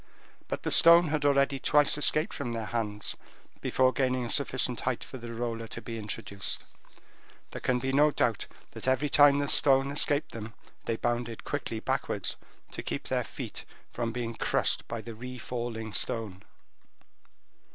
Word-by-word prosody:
But - - -4
the - - -2
stone 170 0 +8
had 150 -1 -1
already 140 -1 +3
twice 145 +2 +4
escaped 155 +4 +3
from 120 -4 -4
their 115 -1 -3
hands 105 -3 -2 0.5
before 130 0 +2
gaining 130 -2 0
a 115 - -3
sufficient 125 -3 +1
height 130 -2 -2
for 130 - -9
the 120 0 -8
roller 115 -1 -4
to - - -7
be 115 -1 -6
introduced. 100 -2 -4 0.9
There - - -7
can 125 - +1
be 130 +2 -2
no 150 +2 +5
doubt 115 -6 0 0.2
that - - -8
every 130 +3 +2
time 145 0 +6
the 145 0 0
stone 135 -1 +4
escaped 145 0 +1
them, 115 0 -8 0.3
they 115 - -1
bounded 120 0 -2
quickly 130 -6 -3
backwards, - - -2 0.4
to - - -5
keep - - -5
their - - 0
feet - - -7 0.3
from 115 -1 -2
being 115 -1 -4
crushed - - 0
by 115 - -4
the 115 +1 -8
refalling 120 -2 -6
stone. 100 -2 -3
125 Hz, 160 wpm, -29 LUFS, 115-140 Hz, 0.9 s, stone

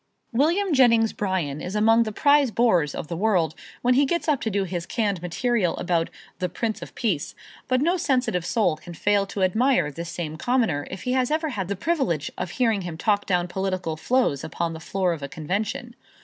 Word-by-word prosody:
William 335 +9 +2
Jennings 230 -4 +4
Bryan 175 -8 -2
is 185 +3 -5
among 225 +2 +5
the 220 -2 0
prize 285 +3 +4
bores 185 - +2
of - - -5
the 170 - -4
world 175 -5 +1 0.3
when 250 +1 +4
he 275 +2 +4
gets 340 +4 -1
up 295 -4 +2
to 225 - -1
do 200 -1 0
his 175 -2 -4
canned 205 -6 -1
material 185 +1 0
about 170 -2 0 0.3
The 180 0 -1
Prince 220 +5 -3
of - - -9
Peace, 180 -11 -1 0.3
but 255 0 +2
no 345 +5 +2
sensitive 250 - 0
soul 190 -3 +1
can 170 +2 -10
fail 200 +2 +2
to 195 0 -2
admire 220 - +2
this 170 +3 -6
same 170 -2 -5
Commoner 225 - 0
if 190 - -7
he 250 - -1
has 255 -1 +1
ever 315 +1 0
had 195 -9 -3
the 200 - -2
privilege 215 - -1
of 180 - -4
hearing 225 0 +1
him 175 -3 -6
talk 205 +3 +1
down 180 -2 +1
political 185 -3 -2
foes 160 - +1
upon 165 +1 -3
the 160 - -7
floor 180 +1 0
of 160 - -7
a 140 - -4
convention. 200 - -3
200 Hz, 205 wpm, -24 LUFS, 170-245 Hz, 0.3 s, among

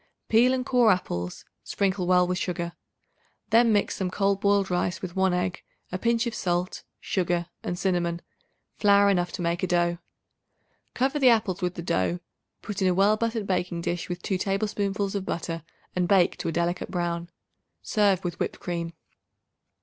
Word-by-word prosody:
Peel 235 +3 +5
and 255 -1 -1
core 245 -4 +4
apples; 90 - -3 0.2
sprinkle 190 -2 -1
well 180 0 +5
with 180 +1 -1
sugar. 170 -1 -3 0.8
Then 230 +1 +5
mix 205 -1 +1
some 190 -2 -1
cold 195 +1 0
boiled 200 -2 +2
rice 180 0 0
with 180 -1 -6
1 190 -1 +3
egg, 180 0 -1 0.3
a 185 - -3
pinch 235 +2 +1
of 235 - -2
salt, 175 0 -2 0.2
sugar 175 -2 -1 0.2
and 175 - -3
cinnamon, 175 -2 -1 0.6
flour 200 -1 +5
enough 175 -2 0
to 175 - -4
make 170 +1 0
a 185 - 0
dough. 175 -1 +1 1.0
Cover 270 +4 +1
the 260 -3 +6
apples 210 -5 +2
with 180 0 -1
the 170 - -5
dough; 165 - 0 0.4
put 205 -2 -5
in 190 - +3
a 180 - +2
well 200 +3 +4
buttered 225 -1 -2
baking 180 -2 -1
dish 175 +1 -3
with 175 0 -5
2 190 -2 -1
tablespoonfuls 200 0 -1
of 200 -2 -2
butter 165 -2 -3 0.3
and 180 -1 +1
bake 185 -2 +4
to - - -3
a - - 0
delicate 170 +2 -1
brown. 170 -1 -2 0.5
Serve 200 -4 +2
with 175 -1 -4
whipped - - -2
cream. 170 -1 -4
185 Hz, 175 wpm, -26 LUFS, 175-200 Hz, 1.0 s, the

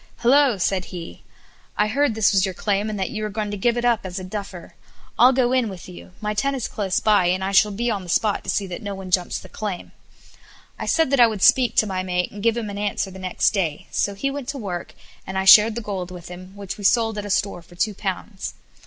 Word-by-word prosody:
"Hilloa!" 260 -3 +4
said 185 +1 0
he; 170 - -9 0.6
"I 210 - +3
heard 250 +2 +1
this 220 -2 +3
was 195 -2 +3
your 190 -2 -2
claim, 205 +2 -1
and 210 -2 -4
that 190 +6 -2
you 215 -3 -4
were 215 - -2
going 210 0 -3
to - - -3
give 235 +4 +1
it 240 - -1
up 235 -2 +3
as 185 0 -6
a 185 - -4
duffer. 190 -2 -7 0.5
I'll 250 +3 +8
go 255 -2 +2
in 255 -4 +2
with 185 -3 -9
you; 180 0 -11
my 210 0 -1
tent 275 +6 0
is 255 - -3
close 195 -2 -1
by, 205 -5 +3
and 185 +2 0
I 195 - -1
shall 200 +2 +5
be 235 +4 -1
on 200 -3 -2
the 180 - -11
spot 210 +4 +1
to - - -6
see 200 - 0
that 180 -2 -7
no 200 -1 -5
one 190 -1 -8
jumps 180 -1 +1
the - - -10
claim." 205 -5 -6 0.9
I - - -4
said 320 -4 +2
that 275 - +2
I 240 - +8
would 215 -4 -3
speak 255 -2 +5
to - - +4
my 190 -2 -2
mate 180 -1 -1
and 205 - -9
give 230 +1 +2
him 220 -3 -3
an 200 - -6
answer 205 -1 -2
the 190 - -10
next 185 -1 +1
day; 170 -8 -2
so 200 - -1
he 275 +7 -2
went 280 -2 -6
to 275 +1 -4
work, 185 -8 -6 0.3
and 190 - -4
I 190 - 0
shared 215 +3 +8
the 235 - -3
gold 195 -4 -4
with 180 -2 -10
him, 185 +2 -11
which 200 0 -7
we - - -8
sold 225 +1 +2
at 205 - -5
a - - -7
store 195 -2 0
for 170 +1 -18
two 205 +4 0
pounds. 195 +1 -5
205 Hz, 265 wpm, -22 LUFS, 185-225 Hz, 0.9 s, I'll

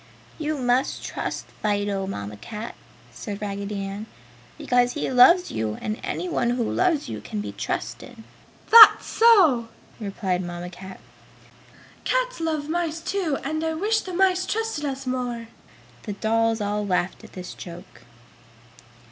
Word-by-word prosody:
"You 305 -1 -2
must 250 0 0
trust - - -4 0.2
Fido, 205 -2 -1
Mamma 105 - -5
Cat!" 210 - -7 0.4
said 205 -3 -7
Raggedy 200 -1 -4
Ann, 200 +3 -6 0.5
"because 245 0 +2
he 295 - -2
loves 340 +9 +6
you 110 -1 -2
and 215 +1 -4
anyone 345 -9 -1
who 240 0 0
loves 325 +4 +1
you - - -6
can 215 - -5
be 205 - -4
trusted!" - - -5 0.5
"That's 445 -1 +10
so!" 365 - +5 0.3
replied 195 -3 -2
Mamma 175 0 -6
Cat. 190 +1 -10 1.0
"Cats - - 0
love 315 -3 -2
mice, 330 0 -1
too, 335 -4 -1
and 315 0 -2
I 320 0 -1
wish 430 +6 +1
the 370 - -7
mice 370 0 +2
trusted 445 -9 -2
us 270 -1 -4
more!" 245 -3 -3 0.5
The 205 - -5
dolls 225 +2 +1
all 205 0 -1
laughed 185 -2 -1
at - - -14
this 180 -1 -7
joke. 175 +2 -11
240 Hz, 140 wpm, -24 LUFS, 200-325 Hz, 1.0 s, That's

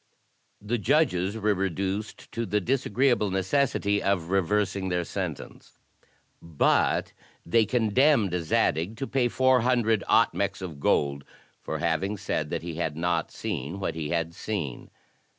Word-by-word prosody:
The 110 +4 -2
judges 110 - +1
were 105 -1 +2
reduced 95 +2 -3
to 115 -1 -3
the 105 +2 +1
disagreeable 125 0 +1
necessity 100 +1 +1
of 95 -3 0
reversing 95 0 0
their 90 -1 0
sentence; - - -6 0.6
but 80 -3 +1 0.3
they 110 +5 +3
condemned 120 - +3
Zadig 80 +5 0
to 135 - -3
pay 130 -2 +1
four 130 0 +3
hundred 115 -4 +2
otmces 100 -1 +2
of 80 -6 -7
gold 70 0 +1 0.4
for - - -4
having 95 +5 -1
said 80 -6 -2
that - - -3
he 85 -1 -5
had 80 -3 -2
not 85 -1 0
seen 75 +10 -4
what 100 - -2
he 80 -2 -4
had 85 0 -1
seen. 85 - -5
100 Hz, 135 wpm, -27 LUFS, 85-115 Hz, 0.6 s, they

